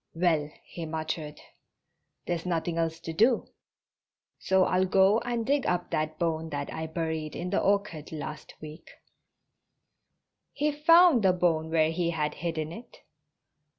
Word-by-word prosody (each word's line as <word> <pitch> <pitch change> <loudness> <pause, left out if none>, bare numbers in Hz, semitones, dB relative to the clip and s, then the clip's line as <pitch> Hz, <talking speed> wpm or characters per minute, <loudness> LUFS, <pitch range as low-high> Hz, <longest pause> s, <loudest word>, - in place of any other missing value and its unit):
"Well," 160 -4 +1
he 165 -2 -7
muttered, 155 -1 -4 0.9
"there's 170 -1 -2
nothing 170 -1 -2
else 165 0 -1
to 165 - -6
do, 225 +8 +3 0.9
so 190 0 +3
I'll 185 +1 +1
go 195 +3 +4
and 235 -2 -3
dig 280 +1 +1
up 175 0 -1
that 155 0 -2
bone 160 -1 -1
that 145 -2 -4
I 160 0 -4
buried 160 -2 -3
in 180 +1 -4
the 200 - +2
orchard 200 -6 -1
last 150 -1 -7
week." 155 +1 -11 1.6
He 300 +1 0
found 330 -1 +6
the 190 -2 +4
bone 165 -3 +1
where 160 -1 +2
he 170 0 -1
had 155 -3 -1
hidden 160 -1 -4
it. 230 +7 -11
165 Hz, 145 wpm, -28 LUFS, 160-190 Hz, 1.6 s, found